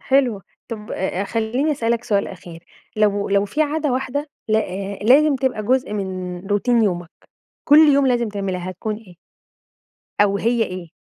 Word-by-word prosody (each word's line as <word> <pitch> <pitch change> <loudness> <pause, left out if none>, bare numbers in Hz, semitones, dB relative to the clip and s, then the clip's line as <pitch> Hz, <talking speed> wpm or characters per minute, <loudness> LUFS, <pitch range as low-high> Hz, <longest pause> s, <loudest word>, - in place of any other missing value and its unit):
حلوة. 255 -7 +1 0.3
طب 215 -2 -7
آآ 190 +1 -2
خلّيني 235 +8 0
أسألك 235 -3 -1
سؤال 200 -4 0
أخير. 175 -2 -11 0.3
لو 205 -1 +1
لو 200 0 +2
في 295 +10 0
عادة 300 -1 -1
واحدة 265 +3 -2 0.2
ل 215 - +3
آآ 200 -1 -3
لازم 275 +5 +5
تبقى 260 -5 -1
جزء 255 +1 +1
من 185 -3 -4
routine 230 +3 +2
يومك، 175 -4 -2 0.5
كُل 295 +1 +7
يوم 285 -3 +6
لازم 240 -3 +1
تعملها، 190 -3 -3
هتكون 210 +4 -4
إيه؟ 210 -5 -15 1.1
أو 200 -1 +3
هي 230 +2 +1
إيه؟ 180 -4 -7
215 Hz, 160 wpm, -21 LUFS, 195-255 Hz, 1.1 s, كُل